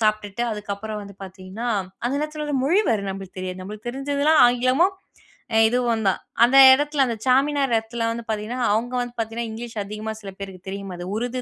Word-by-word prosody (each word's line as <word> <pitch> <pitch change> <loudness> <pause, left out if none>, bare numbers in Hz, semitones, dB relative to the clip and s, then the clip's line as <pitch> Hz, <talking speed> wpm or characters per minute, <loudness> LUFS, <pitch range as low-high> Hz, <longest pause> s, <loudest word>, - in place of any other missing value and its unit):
சாப்பிட்டுட்டு, 215 0 0
அதுக்கப்பறம் 210 0 -5
வந்து 200 0 -11
பாத்தீங்கன்னா, 190 +5 -7 0.4
அந்த 250 - 0
நேரத்துல 305 0 -4
வேற 295 - -2
மொழி 350 +9 +4
வேற 220 -3 +1
நம்பளுக்கு 190 -1 -8
தெரியாது. 185 0 -5
நம்பளுக்கு 210 +5 -7
தெரிஞ்சதெல்லாம் 285 +4 +2
ஆங்கிலமும், 255 +10 +2 0.7
இதுவும் 235 -2 0
தான். 190 - +2 0.2
அந்த 255 +3 +5 0.2
எடத்துல, 290 0 +2
அந்த 235 - -2
சார்மினார் 270 0 +3
எடத்துல 230 +1 -3
வந்து 235 0 -5
பாத்தீங்கன்னா, 220 +4 -3
அவங்க 240 +3 -1
வந்து 245 0 -5
பாத்தீங்கன்னா, 225 +1 -3
இங்கிலீஷ் 230 0 -7
அதிகமா 215 +2 -5
சில 195 -2 -7
பேருக்கு 190 -2 -9
தெரியும். 195 -1 -6
அது 175 - -6
உருது 245 +2 -3
230 Hz, 175 wpm, -23 LUFS, 205-255 Hz, 0.7 s, அந்த